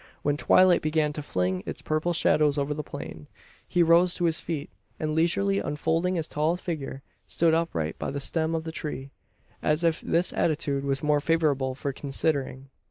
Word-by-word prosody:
When 145 0 +1
twilight 185 +3 +5
began 155 -1 0
to 150 - -4
fling 90 -8 -1
its - - -6
purple 155 +3 0
shadows 150 -3 +2
over 140 +1 0
the 150 - -4
plain, 80 - -8 0.4
he 175 - +3
rose 170 +2 +4
to 175 - -1
his 160 -1 +2
feet; 155 -3 -5 0.3
and, 155 0 -1
leisurely 195 +5 +2
unfolding 165 +5 0
his 165 -3 -1
tall 155 +3 0
figure, 155 -6 -5 0.2
stood 165 -1 +2
upright 120 - -1
by - - -3
the 140 - -3
stem 160 +3 +1
of 160 - -2
the 160 - -5
tree 140 -4 -6 0.5
as 150 +3 +1
if 165 -1 +1
this 170 +2 +1
attitude 145 -4 0
was 135 0 0
more 150 0 +3
favourable 145 -4 +1
for 140 +1 -3
"considering." 135 -1 -2
155 Hz, 180 wpm, -26 LUFS, 140-165 Hz, 0.5 s, twilight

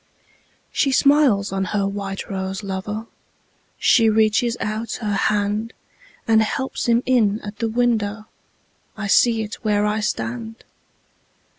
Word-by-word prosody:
She 275 - +1
smiles 265 -9 +3
on 195 0 -1
her 200 +1 -1
white 195 -1 -5
rose 190 +1 -4
lover, 200 +3 -4 0.7
She 225 -3 +4
reaches 220 +2 +2
out 215 +1 -3
her 210 -3 -3
handAnd 220 - -1
helps 265 +4 -2
him 235 +1 +3
in 225 -5 +2
at 205 0 -8
the 230 - 0
window—I 220 -2 -4
see 225 +2 +3
it 215 +1 -8
where 210 -1 +1
I 210 +1 0
stand! 225 +1 -4
215 Hz, 120 wpm, -21 LUFS, 205-230 Hz, 0.7 s, She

